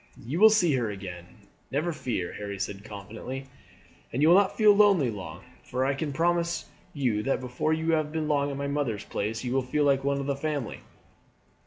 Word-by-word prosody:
"You 145 +8 -2
will 220 +1 +9
see 185 -8 +3
her 120 -3 -1
again, 90 -3 -7 0.4
never 155 +6 -1
fear," 115 - -3
Harry 100 -1 -5
said 100 +1 -4
confidently. 110 +6 -7 0.7
"And 135 +5 0
you 155 - +6
will 175 - +8
not 195 0 +3
feel 215 -2 +7
lonely 200 - +4
long, 90 -4 -8 0.2
for 130 +1 -1
I 135 - +2
can 145 +2 -3
promise 170 +3 0 0.2
you 125 -8 0
that 135 - 0
before 125 +4 -2
you 160 +1 0
have 155 -2 +1
been 155 -1 -2
long 145 -1 +1
at 140 - -4
my 140 - -3
mother's 140 -7 -1
place 110 +3 -3
you 125 -1 -2
will 135 - +2
feel 130 +4 0
like 135 -1 +3
one 140 0 +1
of 140 - -3
the 140 0 0
family." 145 -4 -3
140 Hz, 205 wpm, -27 LUFS, 115-155 Hz, 0.7 s, will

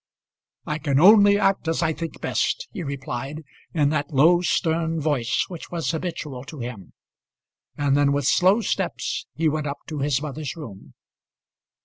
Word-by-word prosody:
"I 150 0 -3
can 140 -1 +1
only 205 +3 +7
act 195 -4 +1
as 165 +1 0
I 160 -1 +1
think 165 +1 -7
best," - - -1
he 205 - -6
replied 140 0 -5 0.3
in 150 -4 +2
that 145 -1 -1
low 165 +5 +5
stern 165 -2 0
voice 145 -6 0
which 175 -3 -9
was 170 -2 -2
habitual 160 -6 -5
to 155 - -10
him; 120 -6 -7 0.8
and 145 -1 +2
then 145 0 +3
with 140 -1 0
slow 190 - +4
steps - - -2
he 165 0 +1
went 155 0 -1
up 140 - -3
to 155 -2 -4
his 140 -1 +1
mother's 150 0 -5
room. 115 - -11
155 Hz, 160 wpm, -24 LUFS, 140-170 Hz, 0.8 s, only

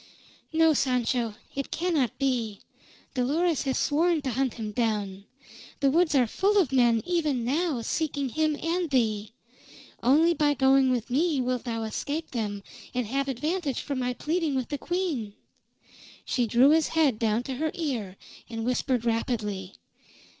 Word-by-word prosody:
"No, 325 0 +4
Sancho. 245 -4 0 0.2
It 275 -1 -4
cannot 320 -7 0
be. 240 -7 -1 0.5
Dolores 300 +5 +1
has 265 -1 0
sworn 320 +1 +2
to 265 - -1
hunt 260 0 -1
him 220 -2 -5
down; 205 -4 -2 0.5
the 275 -2 +3
woods 330 0 +3
are 255 -3 +5
full 395 - +1
of 355 -10 +3
men 240 -4 +3
even 305 -9 0
now, 290 -2 0
seeking 285 +1 -1
him 310 +3 +1
and 335 +2 -1
thee. 220 -5 0 0.7
Only 310 +8 +4
by 295 -3 +2
going 265 0 +4
with 245 -1 -1
me 305 +2 +2
wilt 250 -1 -1
thou 230 -2 -2
escape 285 +8 -4
them 205 -4 -3 0.3
and 250 -1 0
have 275 +5 -1
advantage 295 +3 -2
from 280 -2 -3
my 250 0 -1
pleading 315 -1 -1
with 260 -2 -2
the 290 -2 -3
queen." 330 - -2 0.9
She 245 -2 0
drew 245 +6 +5
his 320 0 +4
head 280 -9 +3
down 225 +1 +1
to 260 -1 -5
her 315 +3 0
ear, 240 - -3 0.3
and 225 -1 -4
whispered 250 -1 0
rapidly. 210 -5 -2
265 Hz, 155 wpm, -27 LUFS, 230-310 Hz, 0.9 s, are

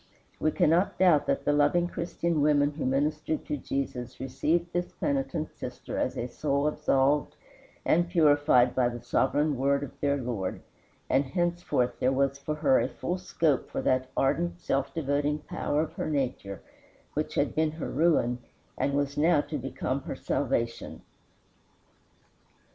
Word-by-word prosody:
We 155 - +2
cannot 165 +5 +2
doubt 175 -5 +4
that 140 - 0
the 145 - +3
loving 150 +4 +3
Christian 170 -2 -2
women 145 -1 +3
who 145 -2 -3
ministered 150 +3 -1
to - - -2
Jesus 130 -3 -4
received 160 +7 -1
this 175 +1 -2
penitent 270 - -2
sister - - -6
as - - -1
a 120 - -2
soul 140 +3 -1
absolved 145 -1 +1 0.5
and 175 +2 +3
purified 145 -7 +4
by 125 -2 +2
the 120 0 -7
sovereign 145 +4 +1
word 140 +2 +1
of 140 - -6
their 140 0 +1
Lord, 120 -8 -4 0.4
and 135 +2 +3
henceforth 175 -5 -1
there 130 - +2
was 135 +1 +1
for 150 +2 -3
her 145 -4 +3
a - - +1
full 180 +1 -4
scope 165 -6 0
for - - -3
that 130 0 +1
ardent, 85 -10 +1
self 135 +11 -1
devoting 145 -1 0
power 150 0 -2
of 160 - -7
her - - -3
nature 125 - -2 0.5
which - - -2
had - - +1
been 155 -1 +1
her 160 - -5
ruin, 135 -6 +2 0.4
and 140 - +1
was 140 0 -1
now 160 0 +4
to 150 - -5
become 130 +1 -3
her 135 - -6
salvation. 120 -4 -2
145 Hz, 155 wpm, -28 LUFS, 130-155 Hz, 0.5 s, doubt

